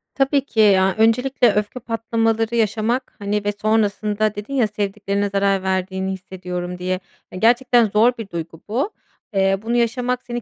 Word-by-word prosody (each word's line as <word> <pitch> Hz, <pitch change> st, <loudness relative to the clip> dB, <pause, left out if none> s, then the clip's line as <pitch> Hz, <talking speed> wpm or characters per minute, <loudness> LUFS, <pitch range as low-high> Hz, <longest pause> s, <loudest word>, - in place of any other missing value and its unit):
Tabii 275 Hz, 0 st, +2 dB
ki 225 Hz, -, -4 dB
ya, 190 Hz, -2 st, +5 dB
öncelikle 235 Hz, +1 st, +3 dB
öfke 210 Hz, +4 st, -2 dB
patlamaları 225 Hz, 0 st, -1 dB
yaşamak, 225 Hz, +3 st, 0 dB
hani, 205 Hz, 0 st, -2 dB
ve 205 Hz, -, +2 dB
sonrasında 215 Hz, -1 st, +1 dB
dedin 210 Hz, +7 st, -7 dB
ya 245 Hz, -5 st, +2 dB
sevdiklerine 200 Hz, -1 st, -2 dB
zarar 195 Hz, -1 st, +1 dB
verdiğini 190 Hz, 0 st, -1 dB
hissediyorum 180 Hz, -1 st, -6 dB
diye. 185 Hz, +1 st, -2 dB, 0.3 s
E, 185 Hz, -, -7 dB
gerçekten 240 Hz, +2 st, +4 dB
zor 215 Hz, +4 st, +4 dB
bir 220 Hz, -3 st, -7 dB
duygu 165 Hz, -2 st, -6 dB
bu. 260 Hz, -, -1 dB, 0.4 s
Eee, 195 Hz, 0 st, +2 dB
bunu 230 Hz, +2 st, -2 dB
yaşamak 245 Hz, +1 st, 0 dB
seni 240 Hz, 0 st, -5 dB
215 Hz, 155 wpm, -21 LUFS, 195-235 Hz, 0.4 s, ya